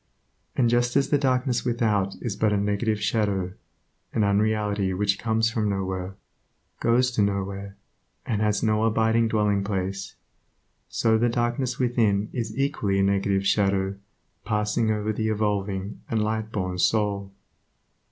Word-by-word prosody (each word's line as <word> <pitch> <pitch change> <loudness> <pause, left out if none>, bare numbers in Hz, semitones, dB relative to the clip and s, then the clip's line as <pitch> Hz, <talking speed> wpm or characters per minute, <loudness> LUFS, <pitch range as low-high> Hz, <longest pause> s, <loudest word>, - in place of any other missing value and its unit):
And 125 - +3
just 120 +1 +1
as 140 -1 +3
the 145 - +4
darkness 130 -2 +1
without 110 -5 0
is 120 -5 -2
but 110 -1 +1
a 105 - +2
negative 105 +2 0
shadow, 100 -3 0 0.6
an 110 - +2
unreality 105 -1 +1
which 100 +1 +1
comes 115 0 +1
from 110 -3 0
nowhere, 95 -1 -3 0.6
goes 125 +2 +3
to 120 - 0
nowhere, 100 0 -2 0.5
and 110 -3 -1
has 105 -1 +1
no 110 -1 +2
abiding 115 +1 +2
dwelling 105 -2 +1
place, 95 -1 -3 0.7
so 110 -1 +2
the 120 +1 +3
darkness 120 +2 -1
within 110 -5 +1
is 120 -1 -4
equally 135 -8 0
a 95 - +3
negative 100 0 +1
shadow 95 -1 +2 0.5
passing 105 +1 0
over 105 0 0
the 110 +1 -1
evolving 100 -2 -2
and 115 - 0
Lightborn 105 -4 -2
soul. 100 0 +1
105 Hz, 140 wpm, -25 LUFS, 100-115 Hz, 0.7 s, the